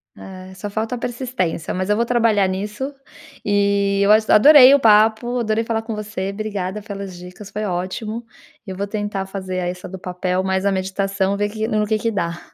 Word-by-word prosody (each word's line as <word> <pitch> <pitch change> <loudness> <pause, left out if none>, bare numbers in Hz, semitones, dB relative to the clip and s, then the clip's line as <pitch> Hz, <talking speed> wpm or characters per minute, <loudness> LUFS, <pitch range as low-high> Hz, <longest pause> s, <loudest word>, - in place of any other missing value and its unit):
É, 185 0 -11
só 190 +2 -6
falta 220 +4 -3
a - - -2
persistência, 240 - -3
mas 185 +1 -3
eu 210 - +3
vou 235 +2 +1
trabalhar 230 -5 +2
nisso 210 +9 -4 0.5
e 200 -1 +1
eu 200 - +4
ach 215 0 +4
adorei 270 +3 +8
o - - +3
papo, 225 +2 +3
adorei 220 -1 0
falar 225 -1 -2
com 225 -1 -5
você, 210 -2 -4
obrigada 200 -1 -4
pelas 200 -3 -7
dicas, 180 +3 -11
foi 210 - -4
ótimo. 200 +5 -4 0.4
Eu 190 -2 -7
vou 200 - -2
tentar 205 -2 -3
fazer 190 -1 -5
a - - -2
essa 180 0 -6
do 190 - -7
papel, 180 0 -2
mais 190 0 -1
a - - +2
meditação, 195 +1 -1
ver 205 +1 -1
que 220 +1 -3
no 215 -1 0
que 215 0 +1
que 230 +2 -1
dá. 170 -4 -3
205 Hz, 200 wpm, -20 LUFS, 190-220 Hz, 0.5 s, adorei